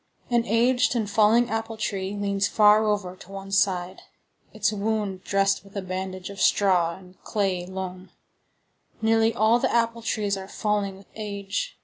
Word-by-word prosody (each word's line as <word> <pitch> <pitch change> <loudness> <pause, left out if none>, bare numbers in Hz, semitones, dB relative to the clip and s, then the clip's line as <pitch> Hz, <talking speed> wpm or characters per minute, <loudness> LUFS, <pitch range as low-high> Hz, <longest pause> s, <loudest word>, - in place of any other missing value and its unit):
An 235 -1 +2
aged 245 +3 +2
and 220 -3 0
falling 220 +3 +3
apple 225 0 -3
tree 195 -2 -3
leans 200 -1 0
far 210 0 +5
over 200 -4 -1
to 185 0 -15
one 195 0 -8
side, 185 -2 +1 0.5
its 215 -1 0
wound 205 -2 -2
dressed 195 0 +1
with 200 0 -11
a - - -1
bandage 185 0 -5
of 195 -1 -7
straw 180 -4 +3
and 185 -1 -16
of - - -34
clayey 190 -4 -1
loam. 185 0 -6 0.9
Nearly 225 0 +3
all 230 +1 +3
the - - 0
apple 230 0 +1
trees 210 -3 -1
are 190 0 -7
falling 205 -2 -1
with 195 - -16
age. 205 - -4
200 Hz, 165 wpm, -25 LUFS, 190-220 Hz, 0.9 s, far